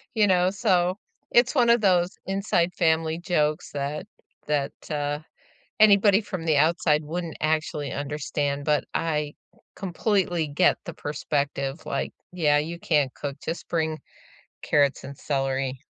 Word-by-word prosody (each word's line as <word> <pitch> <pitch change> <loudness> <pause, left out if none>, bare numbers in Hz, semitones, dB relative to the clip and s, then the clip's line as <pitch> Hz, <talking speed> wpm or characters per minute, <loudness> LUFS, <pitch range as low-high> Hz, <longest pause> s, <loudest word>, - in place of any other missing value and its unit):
You 215 -2 +4
know? 180 -1 +3
So, 185 -3 +1 0.3
it's 240 +3 +4
one 245 -4 +4
of 235 0 +5
those 185 -2 +2
inside 195 -3 0
family 160 -1 +1
jokes 155 -3 0
that 145 +3 -3 0.4
that, 145 -2 0 0.2
uh, 145 -1 -1 0.6
anybody 205 -1 +6
from 185 -5 -6
the 160 -2 +2
outside 155 0 +2
wouldn't 165 +2 -4
actually 155 -2 -1
understand, 145 0 -2
but 150 -2 +2
I 150 -2 -1 0.4
completely 185 -3 0
get 155 +5 +3
the 170 - -7
perspective, 140 -1 -3
like, - - -2 0.2
"Yeah, 150 -5 +3
you 165 +3 -4
can't 145 -7 +1
cook, 140 -1 -5
just 165 - -5
bring 160 -2 -1 0.6
carrots 145 -2 +2
and 140 0 -9
celery." 135 -2 -2
160 Hz, 135 wpm, -25 LUFS, 145-180 Hz, 0.6 s, anybody